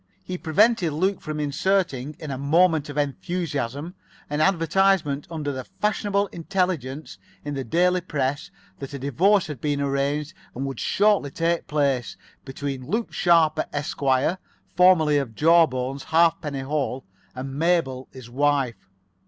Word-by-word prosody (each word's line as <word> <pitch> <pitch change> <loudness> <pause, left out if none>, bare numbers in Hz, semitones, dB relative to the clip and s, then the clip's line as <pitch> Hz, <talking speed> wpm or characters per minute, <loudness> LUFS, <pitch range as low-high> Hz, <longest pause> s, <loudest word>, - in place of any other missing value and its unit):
He 185 - -5
prevented 180 +1 +2
Luke 190 +5 0
from 155 -1 -5
inserting, 150 -2 0
in 150 - -7
a 135 - -3
moment 160 +1 +3
of 145 - -7
enthusiasm, 145 0 -3 0.4
an 150 +1 0
advertisement 165 -3 +2
under 155 -4 -3
the 130 -1 -5
Fashionable 205 - -1
Intelligence 160 - -3 0.3
in 145 - -3
the 135 -1 -3
daily 180 +8 +2
press 145 -4 -2 0.3
that 140 0 -7
a - - -3
divorce 175 - +2
had 150 -7 -7
been 145 -1 -1
arranged 140 +3 -1 0.2
and 135 +3 -3
would 135 -1 -5
shortly 205 -8 +2
take 165 +3 -1
place, 140 -5 0 0.3
between 135 -1 -5
Luke 225 +5 -2
Sharper, 165 -3 +3
Esq., 145 0 -4 0.8
formerly 165 -5 +5
of 120 -6 -5
Jawbones, 140 -4 +2
Halfpenny 160 -3 +2
Hole, 135 -1 -2 0.3
and 135 +1 -6
Mabel, 145 -4 0
his 130 -3 -11
wife. 135 -5 0
150 Hz, 135 wpm, -24 LUFS, 135-175 Hz, 0.8 s, formerly